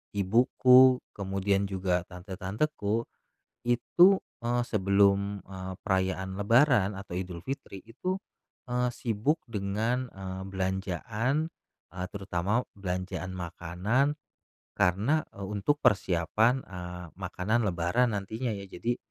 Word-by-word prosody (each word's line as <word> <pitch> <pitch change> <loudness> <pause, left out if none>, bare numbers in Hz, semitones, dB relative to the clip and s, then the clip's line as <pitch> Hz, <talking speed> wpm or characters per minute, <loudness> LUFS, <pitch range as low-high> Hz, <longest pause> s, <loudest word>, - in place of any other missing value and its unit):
ibuku, 125 +5 +6 0.2
kemudian 100 0 0
juga 90 -2 0
tante-tanteku, 100 +5 -2 0.6
itu, 120 +9 +5 0.4
eee, 120 +1 +2
sebelum, 100 -1 +2
eee, 95 -1 -6
perayaan 95 -1 0
lebaran 115 -2 +4
atau 95 -2 -8
Idulfitri 95 +3 -6
itu, 180 +12 -3 0.5
eee, 125 0 +1
sibuk 120 +8 0
dengan, 110 +4 -1
eee, 95 -2 -7
belanjaan, 100 - -1 0.4
eee, 90 0 -3
terutama 100 +3 0 0.2
belanjaan 95 -1 -3
makanan, 90 - 0 0.6
karena, 110 - +2
eee, 100 - -6
untuk 105 +8 0
persiapan, 105 - +3
eee, 90 -1 -7
makanan 95 +5 -1
lebaran, 95 +7 +1
nantinya 110 +4 -3
ya. 100 - -7
Jadi 115 +6 -3
100 Hz, 100 wpm, -29 LUFS, 95-120 Hz, 0.6 s, ibuku